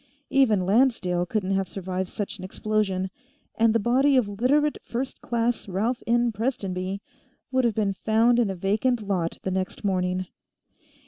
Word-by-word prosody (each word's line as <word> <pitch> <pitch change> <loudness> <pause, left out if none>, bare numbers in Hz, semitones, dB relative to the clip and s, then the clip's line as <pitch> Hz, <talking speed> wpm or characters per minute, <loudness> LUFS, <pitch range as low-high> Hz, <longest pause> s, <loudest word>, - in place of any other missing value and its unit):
Even 220 -9 +3
Lancedale 190 -5 +2
couldn't 195 -1 -1
have 195 -1 0
survived 185 -1 -4
such 210 0 -5
an - - -8
explosion, 190 -1 -1 0.4
and 225 0 +3
the 230 - +2
body 265 +5 +3
of 245 -5 +3
Literate 265 +9 +1
First 255 +3 -4
Class 235 -1 -1
Ralph 215 +6 -1
N. 240 0 +3
Prestonby 195 -5 -3 0.5
would 260 -1 +2
have 230 -3 +1
been 205 -3 +1
found 225 +4 +3
in 230 -4 +2
a 190 - -3
vacant 215 +6 0
lot 175 -4 -1
the 190 - -2
next 185 +2 -3
morning. 185 -1 0
210 Hz, 155 wpm, -25 LUFS, 190-240 Hz, 0.5 s, Even